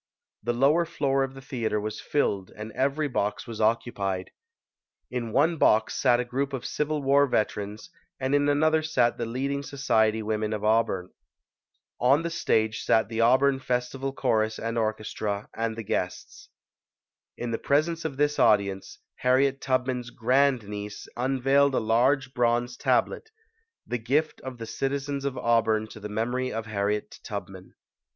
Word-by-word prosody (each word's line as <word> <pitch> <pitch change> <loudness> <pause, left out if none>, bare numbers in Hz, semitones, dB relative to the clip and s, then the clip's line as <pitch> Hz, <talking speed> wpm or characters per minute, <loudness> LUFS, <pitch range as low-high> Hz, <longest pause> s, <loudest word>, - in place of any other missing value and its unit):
The 120 +3 -1
lower 140 +8 +4
floor 140 -5 0
of 135 0 -5
the 135 - -11
theatre 115 -5 -2
was 110 +1 -5
filled 100 -10 0
and 110 +1 -7
every 140 +5 0
box 105 -6 -2
was 115 -3 -6
occupied. 105 -4 0 0.8
In 120 -2 -3
one 160 +7 +3
box 110 -6 +3
sat 120 -1 +3
a 125 - -1
group 135 +3 -2
of 130 - -4
Civil 150 -1 -2
War 140 +1 +4
veterans 105 -2 -2 0.3
and 130 +1 -1
in 145 0 +3
another 155 +2 +3
sat 155 -6 +1
the 115 - -2
leading 135 +4 -2
so 140 0 -9
ciety 110 -4 +2
women 110 0 -1
of 105 -1 -4
Auburn. 105 -4 +1 0.9
On 135 +6 +4
the 170 - -3
stage 110 -10 +1
sat 110 - +2
the 115 -1 -1
Auburn 130 +3 +4
Festival 130 +2 -2
Chorus 110 -5 0
and 115 +1 -3
Orchestra 110 -2 -2
and 115 0 -2
the 115 - -5
guests. 90 -3 -4 0.9
In 120 -1 -3
the 115 - -2
presence 160 +4 +1
of 145 -4 -4
this 145 +1 +1
audience, 100 -2 +2 0.2
Harriet 135 +2 +2
Tub 130 -1 +1
man's 125 -2 -3
grand 125 -1 +2
niece 105 0 -6
unveiled 135 +2 +2
a - - +3
large 125 +4 +2
bronze 120 0 +1
tablet 445 - 0 0.6
the 120 - -3
gift 145 +7 0
of 130 -1 -7
the 115 - -6
citizens 140 +3 -3
of 135 -2 -2
Auburn 110 -2 +2
to 110 - -11
the 105 0 -7
memory 120 +4 -1
of 110 0 -4
Harriet 105 0 -2
Tubman. - - -7
125 Hz, 160 wpm, -26 LUFS, 110-140 Hz, 0.9 s, lower